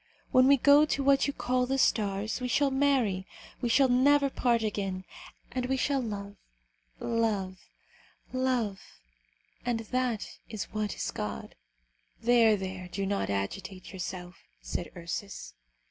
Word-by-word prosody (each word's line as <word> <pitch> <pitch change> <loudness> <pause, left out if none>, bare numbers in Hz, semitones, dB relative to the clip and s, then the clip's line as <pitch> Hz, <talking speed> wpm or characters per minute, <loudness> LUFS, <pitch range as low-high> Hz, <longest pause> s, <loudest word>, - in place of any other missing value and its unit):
When 255 0 +6
we 280 0 +7
go 285 +3 +6
to 280 -2 0
what 275 0 +4
you 280 - -1
call 250 -1 0
the 270 +1 0
stars, 210 -2 +1
we 250 - -1
shall 280 +2 +2
marry, 260 -9 +1 0.3
we 240 - 0
shall 265 +3 +5
never 275 +3 +4
part 235 -3 +1
again, 195 -3 -2 0.5
and 255 -1 -2
we 265 +1 0
shall 275 +1 +1
love, 205 -3 -5 0.6
love, 205 -5 -1 0.7
love; 250 -6 0 0.8
and 240 -2 -1
that 245 0 -2
is 215 -2 -3
what 215 -1 -2
is - - -3
God." - - -5 0.7
"There, 230 -2 +5
there, 190 -1 -5
do 195 +2 -3
not 200 - -1
agitate 185 - -4
yourself," 180 -1 -6 0.2
said 175 - -4
Ursus. 170 - -6
225 Hz, 140 wpm, -29 LUFS, 195-255 Hz, 0.8 s, we